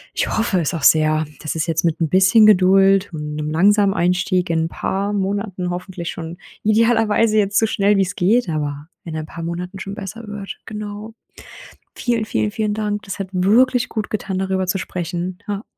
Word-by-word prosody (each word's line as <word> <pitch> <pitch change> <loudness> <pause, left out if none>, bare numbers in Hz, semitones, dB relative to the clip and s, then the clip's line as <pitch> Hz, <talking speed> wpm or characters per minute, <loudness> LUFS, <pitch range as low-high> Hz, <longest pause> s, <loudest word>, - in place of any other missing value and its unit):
Ich - - 0
hoffe 220 -4 0
es 155 - -1
auch 160 - -5
sehr, 155 0 +4 0.2
dass 155 - -4
es 160 - -1
jetzt 165 -1 0
mit 165 0 0
'n 165 - +2
bisschen 190 +5 +5
Geduld 195 -1 +5
und 150 -1 -5
'nem 150 0 -3
langsamen 200 +4 +3
Einstieg 180 0 +1
in 160 -1 +1
'n - - -1
paar 200 +4 -2
Monaten 195 -2 -2
hoffentlich 180 -1 -5
schon 165 +1 -7 0.3
idealerweise 225 0 +3
jetzt 200 -1 +2
so 225 - +3
schnell 205 -1 +2
wie's 190 -2 0
geht, 215 +6 +2
aber 145 -1 -3 0.2
in 165 -2 -6
ein 155 - -4
paar 165 +1 -8
Monaten 180 +3 -5
schon 195 +1 -6
besser 215 +2 -7
wird. 205 -1 -7
Genau. 210 0 -7 0.8
Vielen, 235 -3 -1
vielen, 210 -1 -1
vielen 215 -1 -1
Dank. 210 -1 -2
Das 195 - -7
hat 195 - -3
wirklich 240 +7 +3
gut 215 -1 -4
getan, 195 -3 -3
darüber 190 -1 -1
zu 195 - 0
sprechen, 180 0 -4
ja. 205 0 -3
195 Hz, 190 wpm, -20 LUFS, 175-210 Hz, 0.8 s, bisschen